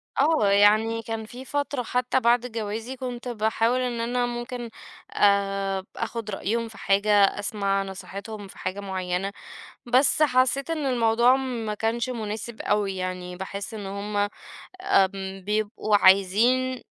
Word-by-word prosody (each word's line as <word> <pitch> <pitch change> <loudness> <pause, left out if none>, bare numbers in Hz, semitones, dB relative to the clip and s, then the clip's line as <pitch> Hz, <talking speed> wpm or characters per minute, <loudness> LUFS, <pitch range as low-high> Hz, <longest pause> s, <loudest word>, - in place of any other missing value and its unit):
آه 290 -7 +3
يعني 215 +3 +4
كان 225 0 -5
في 250 +4 -10
فترة 285 -2 -2
حتى 250 +2 0
بعد 240 0 +3
جوازي 225 +3 -4
كنت 250 -1 -6
باحاول 225 +1 +1
إن 245 -2 -2
أنا 245 +1 0
ممكن 240 0 -5 0.4
آآ 195 -1 +2
آخُد 230 -2 -4
رأيهم 230 +4 -2
في 220 -2 -13
حاجة، 200 +1 +3 0.2
أسمع 200 -2 0
نصيحتهم 200 +2 -8
في - - -15
حاجة 185 +2 -4
معيّنة، 190 -1 -3 0.6
بس 260 +5 +3
حسّيت 260 +1 +2
إن 310 -4 -1
الموضوع 240 0 +4
ما 235 -5 -3
كانش 235 +4 -1
مناسب 220 0 -5
أوي 205 -2 0
يعني 180 -1 -4
باحس 200 +3 -6
إن 205 -2 -6
هُم 205 +1 -2 0.5
آمم 195 - +1
بيبقوا 210 0 +1
عايزين 220 +7 +4
220 Hz, 135 wpm, -25 LUFS, 200-245 Hz, 0.6 s, يعني